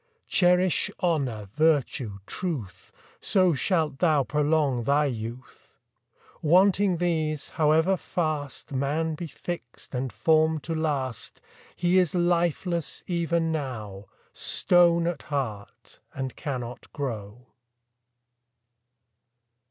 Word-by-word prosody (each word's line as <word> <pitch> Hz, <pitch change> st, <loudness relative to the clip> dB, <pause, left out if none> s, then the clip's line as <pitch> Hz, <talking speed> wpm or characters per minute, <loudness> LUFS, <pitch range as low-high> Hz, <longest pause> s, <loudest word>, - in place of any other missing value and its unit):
Cherish 180 Hz, 0 st, +3 dB
honour, 135 Hz, -, 0 dB
virtue, 140 Hz, -8 st, +1 dB
truth, 130 Hz, -, -5 dB, 0.3 s
So 185 Hz, -3 st, +3 dB
shalt 155 Hz, -2 st, 0 dB
thou 155 Hz, -5 st, +3 dB
prolong 150 Hz, -3 st, +1 dB
thy 145 Hz, +4 st, +3 dB
youth. 120 Hz, -1 st, -7 dB, 0.7 s
Wanting 185 Hz, +3 st, +4 dB
these, 160 Hz, -4 st, -1 dB
however 160 Hz, +4 st, +3 dB
fast 155 Hz, -5 st, -3 dB
Man 145 Hz, +4 st, -1 dB
be 165 Hz, +2 st, -5 dB
fix'd 160 Hz, -6 st, -7 dB
and 130 Hz, 0 st, -2 dB
form'd 160 Hz, -1 st, +2 dB
to 165 Hz, -, -3 dB
last, 145 Hz, -7 st, -2 dB, 0.4 s
He 175 Hz, +1 st, +3 dB
is 180 Hz, -1 st, +1 dB
lifeless 175 Hz, -1 st, 0 dB
even 170 Hz, -2 st, 0 dB
now, 110 Hz, -10 st, -5 dB, 0.3 s
Stone 170 Hz, -1 st, +4 dB
at 170 Hz, -3 st, -2 dB
heart, 125 Hz, -9 st, -5 dB, 0.2 s
and 130 Hz, -1 st, -4 dB
cannot 125 Hz, -6 st, -6 dB
grow. 120 Hz, -4 st, -5 dB
155 Hz, 95 wpm, -26 LUFS, 130-170 Hz, 0.7 s, Wanting